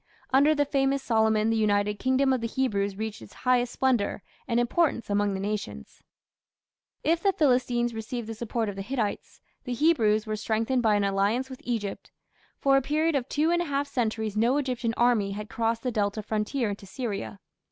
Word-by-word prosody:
Under 290 +3 +5
the 290 -1 +2
famous 275 -1 +1
Solomon 220 -2 +2
the - - +1
united 205 -1 +1
kingdom 260 +1 +2
of 255 - -1
the 230 - -1
Hebrews 205 -6 -1
reached 220 +1 -5
its - - -13
highest 245 -1 +2
splendour 245 -7 0 0.2
and 235 -2 +1
importance 240 -2 +1
among 205 -1 +1
the - - -3
nations. 195 - -5 1.0
If 330 +2 +2
the 395 - +3
Philistines 245 -6 +1
received 225 +1 -5
the 225 - -4
support 225 0 -2
of 205 - -4
the 195 - -5
Hittites, 225 -1 -3 0.2
the 250 - -3
Hebrews 225 -7 +3
were 215 -1 -2
strengthened 225 +4 0
by 220 -3 +3
an 205 - +1
alliance 200 +7 0
with 260 - -9
Egypt. 220 -5 -3 0.5
For 275 -1 +3
a - - +3
period 310 +4 +1
of 270 -2 -1
two 310 +3 +1
and 345 0 +2
a - - -1
half 285 -2 -1
centuries 220 -5 -2
no 235 +6 +2
Egyptian 250 -5 -1
army 230 -5 +2
had 210 +1 -6
crossed 230 0 -1
the 250 - -1
Delta 210 -1 -1
frontier 215 +2 -1
into 200 -1 -8
Syria. 190 - -5
230 Hz, 190 wpm, -27 LUFS, 210-265 Hz, 1.0 s, Under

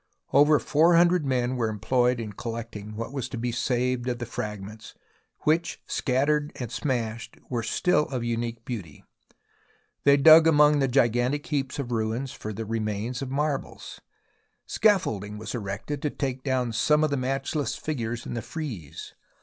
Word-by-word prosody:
Over 145 +2 +6
four 165 +5 +3
hundred 175 -2 +4
men 125 -1 0
were 115 -2 0
employed 125 +3 +1
in 110 -3 -5
collect 115 +2 -6
ing 105 +1 -7
what 115 +4 -5
was 130 -2 -3
to 125 - -5
be 120 +1 -2
saved 125 +1 -1
of 120 - -2
the 120 - -4
fragments 105 -1 -7 0.5
which, 165 +3 +1
shattered 145 +3 0
and 120 -4 -6
smashed, 115 -5 -3
were 120 -2 0
still 150 +8 +1
of 130 -5 -3
unique 115 0 -3
beauty. 100 - -7 1.0
They 140 0 +6
dug 160 +3 +8
among 150 -1 +5
the 135 - +2
gigantic 125 +3 +1
heaps 140 -5 -2
of 130 -4 -4
ruins 115 +3 -1
for 105 - -7
remains 110 +2 -3
of 135 - -4
marbles. 145 +1 -3 0.6
Scaffolding 105 - +1
was 110 - -6
erected 115 +6 -4
to 150 - 0
take 135 -3 -4
down 130 -4 0
some 150 +7 +3
of 155 - +1
the - - +1
matchless 135 +3 -2
figures 120 -6 -4
in - - -5
the 120 - -3
frieze. 115 - -7
125 Hz, 160 wpm, -26 LUFS, 115-145 Hz, 1.0 s, dug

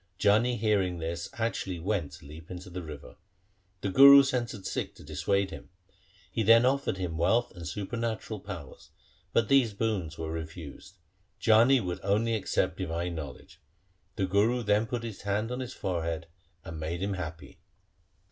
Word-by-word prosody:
Jani 115 +4 +3
hearing 100 -5 +1
this 85 +1 -4
actually 110 -5 -2
went 85 -5 -2
to 80 -1 -13
leap 80 +3 -11
into 90 0 -8
the 90 +1 -5
river. 75 -3 -10 0.6
The 100 - -1
Guru 140 +5 +9
sent 125 -3 -1
a 100 - -11
Sikh - - -3
to - - -14
dissuade 100 -1 0
him. - - -10 0.6
He - - -1
then 115 +3 +6
offered 135 -6 +1
him 85 -4 -3
wealth 115 +8 +2
and 85 -3 -7
supernatural 110 +4 -3
power, 80 -8 -8 0.5
but 115 -2 +2
these 130 -6 +3
boons 100 -8 -2
were 80 -1 -4
refused. 80 +3 -8 0.4
Jani 115 +4 +5
would 90 -3 -3
only 105 +4 +1
accept 110 -3 0
divine 85 -1 -3
knowledge. 80 -4 -8 0.6
The 95 - 0
Guru 105 +6 +2
then 105 +1 +2
put 120 0 -3
his 115 -4 -7
hand 105 +3 -1
on 125 - -3
his 130 0 -5
forehead, 85 -3 -2 0.4
and 80 -1 -7
made 85 +3 -3
him 100 0 -1
happy. 80 -3 -7
100 Hz, 165 wpm, -29 LUFS, 85-115 Hz, 0.6 s, Guru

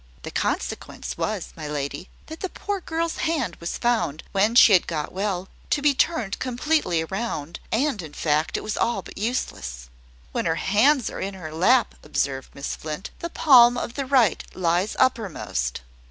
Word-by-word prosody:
"The - - -6
consequence - - -3
was, - - -3
my - - -6
lady, 150 +4 -4 0.2
that 320 +1 -9
the 375 - -3
poor 405 +1 -4
girl's 330 0 -2
hand 310 - -1
was 170 - -4
found, 220 -11 0
when 210 +4 +2
she 230 -3 +8
had 180 - +5
got 155 -3 -3
well, 190 -1 -2 0.2
to - - +2
be 290 0 +4
turned 255 - 0
completely 250 - 0
round: 170 -4 -4
and, 245 -2 +1
in 155 -3 -9
fact, 155 +1 0
it - - -5
is 215 - -2
all 230 -5 0
but - - -11
useless." 65 - -3 0.4
"When - - -2
her - - +2
hands 250 +6 +3
are - - -6
in 195 0 -4
her 160 -4 -8
lap," 235 +10 +3
observed 135 -1 -2
Miss 140 - -4
Flint, 155 +5 -6
"the 340 - -4
palm 245 -7 +6
of 240 - -3
the 275 -1 -3
right 255 -6 +3
lies 180 +3 +1
uppermost. 195 - 0
205 Hz, 175 wpm, -24 LUFS, 160-255 Hz, 0.4 s, she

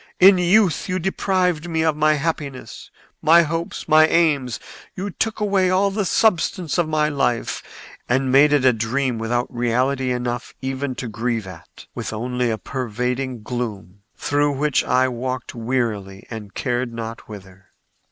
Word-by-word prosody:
In 190 0 +7
youth 180 -2 +3
you 185 - 0
deprived 180 -2 0
me 160 -1 0
of 160 -2 +2
my 155 0 +3
happiness, 145 -3 -4 0.3
my 170 +2 +6
hopes, 165 +2 -4
my 155 0 +6
aims; 145 -8 +1 0.4
you 195 +2 -4
took 220 +4 -2
away 195 -3 +2
all 195 +2 +2
the 205 0 -1
substance 180 -5 +1
of 165 -2 +1
my 155 -1 +2
life 135 -5 -1 0.5
and 130 +1 +1
made 140 +3 +6
it 145 -3 +3
a 130 - +6
dream 115 +2 -1
without 120 +3 -2
reality 125 +2 0
enough 120 -1 -3
even 135 0 -3
to 125 - -5
grieve 115 -1 -2
at—with 95 +3 -9
only 125 +2 -1
a 110 - -1
pervading 125 0 -3
gloom, 105 -6 -5 0.2
through 145 0 +1
which 145 +1 +1
I 130 +1 +2
walked 130 0 -4
wearily 115 -5 -3
and 105 -4 -8
cared 120 -1 -1
not 115 -1 -7
whither. 95 -2 -12
130 Hz, 150 wpm, -21 LUFS, 120-160 Hz, 0.5 s, In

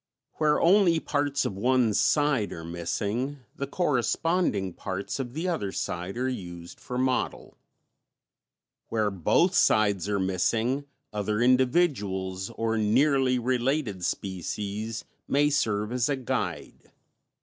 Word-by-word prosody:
Where 150 -1 +3
only 175 -2 +5
parts 145 -2 0
of 95 - -2
one 120 +1 +2
side 145 -3 +2
are 80 - -7
missing 105 - -3
the 140 - -4
corresponding 145 - 0
parts 95 +8 -4
of 125 -1 -5
the 165 +4 -2
other 105 - -1
side 90 +4 -4
are 130 +1 0
used 85 -8 -6
for 125 - -5
model; 130 0 -1 1.3
where 110 -2 +1
both 100 - +2
sides 105 - +3
are 100 -1 +1
missing, 110 +9 0 0.3
other 105 0 -1
individuals 120 - +1
or 115 -1 -1
nearly 130 +4 +3
related 125 -4 -1
species 100 +5 -3 0.2
may 145 +2 +3
serve 105 -6 0
as 125 0 0
a 140 - +2
guide. 130 -3 -4
120 Hz, 120 wpm, -27 LUFS, 100-140 Hz, 1.3 s, only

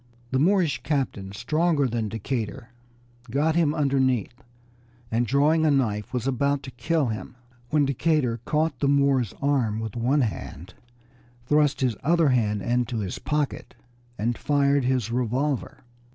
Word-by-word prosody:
The 130 - +1
Moorish 165 -6 +2
captain, 130 -9 -2
stronger 150 - +1
than 115 -3 -2
Decatur, 115 +3 -4 0.6
got 150 +6 +1
him 160 -3 +2
underneath, 130 -6 +1 0.8
and 115 +1 +1
drawing 150 +6 +3
a 155 - +4
knife, 110 -8 0
was 125 -2 -2
about 140 +2 0
to 130 - -8
kill 150 +2 0
him, 110 +2 -6 0.3
when 150 -2 +3
Decatur 140 -3 +1
caught 150 -2 0
the 140 - +1
Moor's 140 -5 +2
arm 125 -7 +1
with 110 -1 -5
one 130 +5 +2
hand, 95 - -5 0.7
thrust 150 +1 +2
his 125 -4 +1
other 165 0 +3
hand 105 -5 +1
into 120 +1 0
his 100 -4 -4
pocket, 150 -2 -2 0.4
and 115 +3 -1
fired 140 -2 +2
his 125 -3 0
revolver. 125 +4 -2
130 Hz, 140 wpm, -25 LUFS, 115-145 Hz, 0.8 s, a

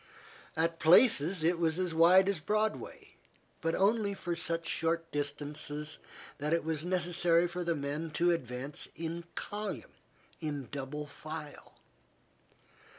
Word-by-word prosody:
At 165 +1 +1
places 175 - +5
it 170 +1 +2
was 165 -1 +1
as 180 -2 -1
wide 180 +4 +6
as 200 -4 +1
Broadway, 215 +5 -2 0.5
but 165 0 0
only 200 0 +2
for 175 -3 -3
such 165 0 -3
short 165 0 0
distances 145 +1 -3 0.4
that 150 +3 0
it 170 - +2
was 160 -1 -1
necessary 175 -1 +2
for 175 +1 -4
the 170 -1 0
men 145 +3 -3
to 175 +1 +4
advance 130 -2 -3
in 170 +1 -4
column, 210 +1 -4 0.5
in 145 -5 -4
double 145 +2 -4
file. 155 +1 -9
165 Hz, 130 wpm, -32 LUFS, 150-175 Hz, 0.5 s, wide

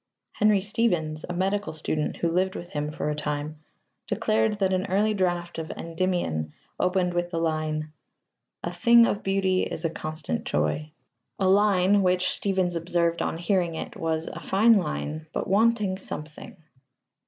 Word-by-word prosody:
Henry 210 -2 +3
Stephens, 175 -8 0
a - - -2
medical 195 +3 -1
student 155 -1 -2
who 170 - 0
lived 185 +2 +1
with 175 - -7
him 150 0 -2
for 150 0 -2
time, 150 0 -4 0.5
declared 110 - +1
that 195 -2 0
an 185 0 0
early 210 +3 +2
draft 175 -3 -1
of 160 - -5
Endymion 165 - -2 0.3
opened 180 -1 +1
with 175 0 -1
the 170 - -4
line: 155 -1 -1 0.7
A 170 - -3
thing 235 +6 +6
of 205 - -1
beauty 195 -1 +1
is 160 - -3
a 165 - 0
constant 155 - -4
joy 110 - -1 0.5
a 190 - +1
line 200 0 +4
which, 185 0 +2
Stephens 185 -3 0
observed 170 0 0
on - - -1
hearing 175 -1 0
it, - - -6
was 160 0 -1
"a - - -6
fine 220 +4 +4
line, 155 - -2
but - - -2
wanting 205 -1 +2
something." 150 -4 -7
175 Hz, 155 wpm, -26 LUFS, 155-195 Hz, 0.7 s, thing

